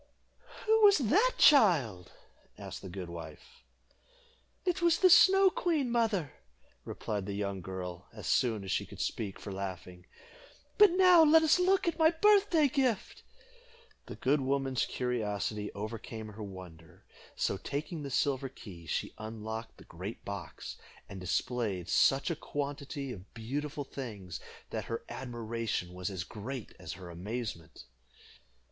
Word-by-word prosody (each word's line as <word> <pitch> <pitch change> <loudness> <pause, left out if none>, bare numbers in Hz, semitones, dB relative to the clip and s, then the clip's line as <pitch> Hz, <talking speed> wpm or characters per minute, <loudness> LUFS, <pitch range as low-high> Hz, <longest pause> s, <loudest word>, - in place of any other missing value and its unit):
"Who 440 0 +4
was 405 -2 +8
she, 275 - +3 0.2
child?" 150 - +5 0.5
asked - - -8
the 95 - -8
good 90 0 -6
wife. 85 - -10 1.0
"It 360 0 0
was 340 -1 +4
the 370 -1 +5
Snow 385 +2 +7
Queen, 305 -10 0
mother," 220 - +1 0.5
replied 105 -2 -4
the 100 - -3
young 100 -2 -3
girl, 90 -1 -6
as - - -10
soon 110 -5 +1
as 95 - -5
she - - +1
could - - -12
speak 100 -4 -3
for 100 - -7
laughing. 90 -2 -6 0.7
"But 415 -1 +9
now 365 -2 +7
let 320 +1 +6
us 315 +3 +4
look 370 0 +3
at 335 -1 -1
my 320 0 +7
birthday 385 -2 +4
gift." 255 -6 -1 0.9
The - - -7
good 140 +3 +1
woman's 135 -2 0
curiosity 105 -4 -2
overcame 110 +1 -6
her 105 +1 -10
wonder; 90 -5 -11 0.3
so, 100 - 0
taking 150 - -4
the 140 - -5
silver 135 0 0
key, 85 -9 -12
she - - -2
unlocked 110 +1 -6
the - - -14
great 95 +7 -8
box, 100 -5 -7 0.3
and 100 - -8
displayed 95 0 -1
such 135 - +3
a - - -1
quantity 140 -2 -4
of 95 -4 -10
beautiful 145 +6 -4
things, 105 -10 -7 0.3
that - - -3
her 115 - -4
admiration 115 -7 -4
was 90 +2 -4
as 95 -3 -4
great 115 +5 -7
as - - -6
her 90 0 -10
amazement. 90 -2 -6
120 Hz, 145 wpm, -31 LUFS, -, 1.0 s, But